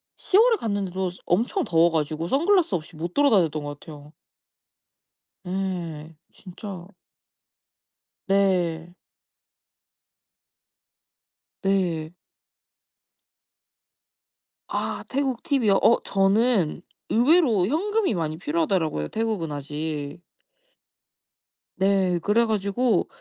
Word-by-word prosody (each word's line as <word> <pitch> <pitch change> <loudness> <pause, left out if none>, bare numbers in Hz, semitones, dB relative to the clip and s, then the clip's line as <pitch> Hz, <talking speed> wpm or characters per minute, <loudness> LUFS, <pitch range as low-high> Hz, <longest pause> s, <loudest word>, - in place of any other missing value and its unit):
10 385 - +1
월에 465 +1 +6
갔는데도 190 -4 -2
엄청 235 - 0
더워 165 0 +3
가지고 155 +1 -2
선글라스 330 - +2
없이 160 0 -6
못 170 +3 -5
돌아다녔던 185 - +2
것 145 0 -7
같아요. 150 -1 -12 1.3
예. 175 -4 -4 0.2
진짜 185 -1 -10 1.4
네. 175 -4 +1 2.7
네. 175 -5 0 2.6
아 - - -3
태국 265 -3 -2
팁이요? 235 -9 +2
어 235 - +4
저는 195 -3 +2 0.3
의외로 240 - +3
현금이 395 - 0
많이 160 -3 -3
필요하더라고요 160 - -1
태국은 215 -8 -2
아직. 150 +2 -5 1.5
네. 190 -2 +2
그래 215 +6 +2
가지고 215 0 0
190 Hz, 180 characters per minute, -24 LUFS, 165-225 Hz, 2.7 s, 월에